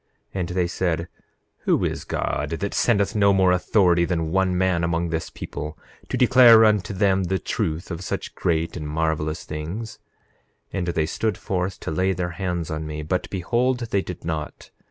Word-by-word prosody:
9:6 95 - -3
And 85 - -2
they 90 0 +1
said: 85 -1 -1 0.6
Who - - +2
is - - -3
God, - - -2
that 95 +5 -3
sendeth 100 -2 +2
no 100 -1 +5
more 95 -1 +4
authority 90 -1 +3
than 80 -2 -1
one 95 0 +2
man 90 -2 +1
among 85 0 0
this 80 0 -3
people, 75 +1 -7 0.3
to - - -1
declare 120 -3 +7
unto 105 0 +2
them 95 -1 +2
the 95 +2 0
truth 80 0 -3
of 85 0 -4
such - - -4
great 80 -1 -1
and 75 -4 -5
marvelous 80 0 -1
things? 85 +9 -6 0.7
9:7 - - -2
And 90 - -2
they 80 -2 +1
stood 105 +4 -1
forth 90 -1 -2
to - - -4
lay 95 +4 +1
their 90 -1 -3
hands 90 -2 -3
on 80 0 -3
me; 75 0 -5
but 90 +4 -2
behold, 120 +7 0
they 100 - +2
did 90 -3 -8
not. 80 -2 -5
90 Hz, 185 wpm, -23 LUFS, 80-95 Hz, 0.7 s, declare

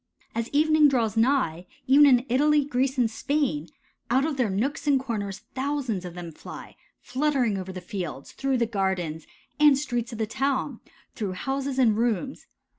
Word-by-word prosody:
As 230 +1 -2
evening 310 +1 +4
draws 235 -6 +1
nigh, 225 - +1 0.2
even 285 +3 +7
in 250 -2 +4
Italy, 290 +3 +3
Greece, 265 -1 0
and 245 - +4
Spain, 225 - -1 0.4
out 260 +4 +3
of 315 -2 -1
their 250 -5 +1
nooks 265 +11 -2
and 280 -2 +4
corners 210 -5 -4
thousands 260 -8 -2
of 175 -1 -8
them 175 -2 -7
fly, - - -10 0.2
fluttering 260 -4 0
over 190 -1 -5
the 185 -1 -7
fields, 175 -8 -6
through 270 -1 -1
the 235 - +2
gardens 190 -7 -2 0.3
and 295 -2 +6
streets 240 -4 -2
of 230 - -6
the 220 - 0
town, 270 +2 -1 0.3
through 200 -4 -3
houses 270 +6 -3
and 235 -5 +4
rooms. 240 +3 -1
245 Hz, 170 wpm, -26 LUFS, 200-275 Hz, 0.4 s, even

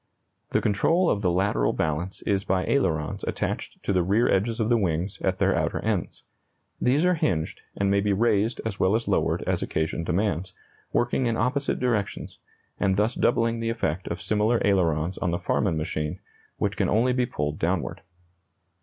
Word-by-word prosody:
The - - +1
control 170 - +2
of 100 - 0
the 95 - +2
lateral 90 -9 +1
balance 80 +4 -2
is 100 -1 0
by 95 -1 0
ailerons 80 - 0
attached - - -3
to - - 0
the 90 - +3
rear 100 +7 +2
edges 110 +4 +1
of 110 - +1
the 120 - +4
wings 90 -1 -1
at 95 0 0
their - - +2
outer - - 0
ends. - - -2 0.6
These 140 +7 +3
are 180 - +4
hinged, 85 - -1 0.2
and 100 0 +1
may 100 - +3
be 105 +1 +1
raised 110 +2 +2
as 105 -3 -3
well 95 +3 +3
as 115 - -1
lowered - - +1
as - - -1
occasion 80 +1 -2
demands, 95 0 -1 0.4
working 120 +1 +1
in 115 - 0
opposite 135 +4 0
directions, 115 -6 -2 0.4
and 95 -2 +2
thus 105 +4 +1
doubling 115 -1 +1
the 115 0 -1
effect 95 -6 -2
of 85 - -4
similar 110 +2 +2
ailerons 90 -3 +1
on - - 0
the 85 - 0
Farman 90 -1 0
machine, 75 -1 -3 0.4
which - - -1
can - - +1
only 120 +4 +3
be 125 -1 +1
pulled 75 -4 -3
downward. 85 -1 -1
100 Hz, 180 wpm, -26 LUFS, 85-115 Hz, 0.6 s, the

